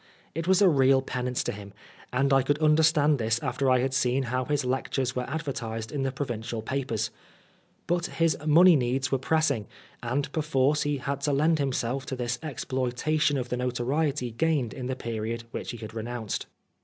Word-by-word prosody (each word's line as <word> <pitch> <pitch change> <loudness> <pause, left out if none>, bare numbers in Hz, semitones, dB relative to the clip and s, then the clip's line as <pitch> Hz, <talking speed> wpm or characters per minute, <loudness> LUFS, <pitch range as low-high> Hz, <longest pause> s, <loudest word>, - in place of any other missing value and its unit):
It 165 +2 -4
was 190 +2 +5
a - - +7
real 135 -4 +4
penance 125 -1 -2
to - - -2
him, 100 -1 -9 0.4
and 135 +2 +2
I 135 - +5
could 145 +3 +1
understand 155 -1 +4
this 110 0 +1
after 135 -1 0
I 130 -1 +4
had 130 +1 -1
seen 130 0 +1
how 125 +1 -1
his 145 -1 0
lectures 130 0 -1
were 125 0 -3
advertised 130 -7 -4
in 145 - -2
the 135 0 0
provincial 120 -4 -4
papers. 120 -3 -2 0.7
But 175 0 0
his 165 -2 +1
money 165 +3 +7
needs 130 0 0
were 135 - +2
pressing, 145 -7 +1 0.3
and 140 +4 -2
perforce 150 -2 +1
he 145 -1 0
had 140 +1 -3
to 145 - +1
lend 155 +3 +3
himself 135 -1 -1
to 135 - -3
this 125 -1 -2
exploitation 145 +1 0
of 125 -2 -3
the 125 - -1
notoriety 125 +2 -1
gained 145 -1 0
in 125 -2 -5
the 130 - -2
period 115 -1 -4
which - - -5
he 120 - -5
had 110 -1 -8
renounced. 115 -1 -4
135 Hz, 185 wpm, -27 LUFS, 120-150 Hz, 0.7 s, a